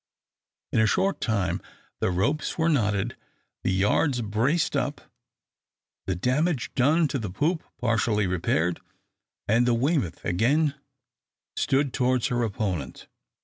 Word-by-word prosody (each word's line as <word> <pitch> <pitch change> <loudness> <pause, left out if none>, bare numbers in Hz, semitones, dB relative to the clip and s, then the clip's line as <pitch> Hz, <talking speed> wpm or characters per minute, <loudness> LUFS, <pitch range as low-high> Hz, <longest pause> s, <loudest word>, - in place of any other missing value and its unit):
In - - +2
a 110 - +4
short 195 - +1
time 100 -5 0 0.4
the - - +1
ropes 100 - 0
were 165 0 +2
knotted, 110 -5 +1 0.5
the - - +1
yards 115 +7 +2
braced 120 +11 +1
up, - - -1 1.1
the 95 - 0
damage 130 - 0
done 150 +5 +3
to 140 - -2
the 105 -4 -4
poop 155 - 0
partially 110 -3 +1
repaired, 90 -1 0 0.7
and 115 +4 +3
the 120 - +3
"Weymouth" 130 - 0
again 140 - +2 0.8
stood 135 -1 +1
towards 130 +1 +1
her 120 -1 0
opponent. 95 - -3
120 Hz, 125 wpm, -26 LUFS, 100-145 Hz, 1.1 s, a